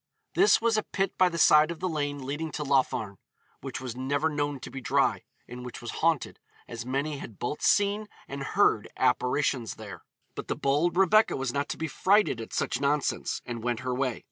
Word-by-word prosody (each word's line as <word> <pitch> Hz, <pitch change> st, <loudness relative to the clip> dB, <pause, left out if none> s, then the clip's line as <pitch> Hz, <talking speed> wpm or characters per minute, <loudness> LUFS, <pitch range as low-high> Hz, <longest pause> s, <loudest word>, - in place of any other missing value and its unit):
This 410 Hz, +4 st, +5 dB
was 230 Hz, -1 st, +2 dB
a -, -, +3 dB
pit 195 Hz, -1 st, -2 dB
by 185 Hz, -1 st, +4 dB
the 170 Hz, -, -5 dB
side 155 Hz, -1 st, +6 dB
of 170 Hz, -2 st, -5 dB
the 185 Hz, -, -1 dB
lane 145 Hz, -4 st, -3 dB
leading 150 Hz, +4 st, -3 dB
to 150 Hz, -, -3 dB
Laugharne, 125 Hz, -7 st, 0 dB, 0.4 s
which 135 Hz, -2 st, -6 dB
was 125 Hz, -2 st, -6 dB
never 140 Hz, +5 st, 0 dB
known 145 Hz, -2 st, -2 dB
to -, -, -8 dB
be 135 Hz, -, -6 dB
dry, -, -, +1 dB, 0.3 s
and 125 Hz, +1 st, -8 dB
which 125 Hz, -, -7 dB
was 120 Hz, -, -6 dB
haunted, 165 Hz, -3 st, +1 dB, 0.3 s
as 120 Hz, +1 st, -7 dB
many 140 Hz, +3 st, -2 dB
had 110 Hz, -7 st, -9 dB
both 135 Hz, +5 st, -4 dB
seen 205 Hz, +1 st, +2 dB, 0.2 s
and 140 Hz, 0 st, -6 dB
heard 135 Hz, -, +2 dB
apparitions 125 Hz, -3 st, +1 dB
there. 100 Hz, -5 st, -9 dB, 0.3 s
But -, -, -7 dB
the -, -, -1 dB
bold 150 Hz, +6 st, +1 dB
Rebecca 195 Hz, +3 st, +4 dB
was 130 Hz, -2 st, -2 dB
not 140 Hz, 0 st, -1 dB
to -, -, -3 dB
be 160 Hz, -, -2 dB
frighted 190 Hz, -, +2 dB
at 115 Hz, -, -8 dB
such 125 Hz, -, -1 dB
nonsense, 145 Hz, 0 st, 0 dB
and 120 Hz, -2 st, -5 dB
went 120 Hz, 0 st, -2 dB
her 130 Hz, 0 st, -2 dB
way. 130 Hz, -2 st, -1 dB
140 Hz, 205 wpm, -28 LUFS, 125-160 Hz, 0.4 s, side